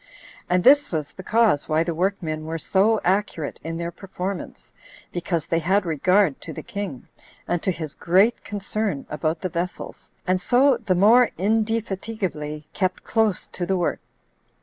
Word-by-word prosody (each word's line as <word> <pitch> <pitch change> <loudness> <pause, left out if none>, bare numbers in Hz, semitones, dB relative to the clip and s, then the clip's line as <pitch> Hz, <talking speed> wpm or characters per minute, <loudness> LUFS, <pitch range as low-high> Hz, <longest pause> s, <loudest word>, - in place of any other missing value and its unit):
And 180 0 +2
this 285 +2 +6
was 150 -4 -2
the 190 - -10
cause 220 -7 +2
why 155 +1 +3
the 170 0 -2
workmen 165 -3 -2
were 165 +1 -3
so 200 +7 +2
accurate 185 -5 -1
in 165 +1 -4
their 170 0 -3
performance, 190 0 -6 0.4
because 170 -2 -2
they 165 - 0
had 190 +4 +1
regard 175 0 +2
to 165 - -7
the - - -7
king, 195 -11 -6 0.4
and 175 - 0
to - - -1
his 160 -4 -6
great 195 +7 +2
concern 205 -5 -3
about 155 +2 -1
the 185 - -2
vessels, 175 +2 -5 0.2
and 185 0 +1
so 255 +5 +4
the 220 -6 0
more 225 +6 +6
indefatigably 195 -7 -2
kept 185 -2 -1
close 220 -4 0
to 180 - -5
the 190 - +1
work. 175 - 0
185 Hz, 160 wpm, -23 LUFS, 165-210 Hz, 0.4 s, this